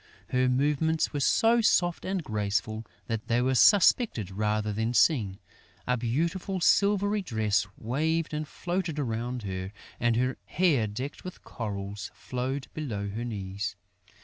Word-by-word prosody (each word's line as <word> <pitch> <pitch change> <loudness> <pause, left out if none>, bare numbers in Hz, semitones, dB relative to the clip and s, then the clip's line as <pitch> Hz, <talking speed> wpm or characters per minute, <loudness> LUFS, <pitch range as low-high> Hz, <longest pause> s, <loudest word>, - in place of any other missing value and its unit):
Her 125 0 +2
movements 150 +5 +1
were 145 - -1
so 230 - +4
soft 175 -5 +2
and 190 -2 -1
graceful 110 0 -2 0.2
that 115 0 -4
they 120 0 +2
were 130 +2 +2
suspected 130 - +4
rather 105 +1 0
than 110 +3 -1
seen. 110 - +3 0.5
A 125 - +2
beautiful 165 +11 -1
silvery 205 +3 +3
dress 110 - 0
waved 155 +8 -1
and 150 0 -3
floated 175 -2 -3
around 120 -2 -2
her; 95 -1 -4 0.3
and 120 -1 +2
her 130 +2 0
hair 150 -11 +2
decked 125 +8 -6
with 185 - -9
corals 100 -2 -5
flowed 130 +2 -4
below 105 -10 -3
her 110 +4 -4
knees. 100 -3 -4
125 Hz, 140 wpm, -28 LUFS, 105-160 Hz, 0.5 s, so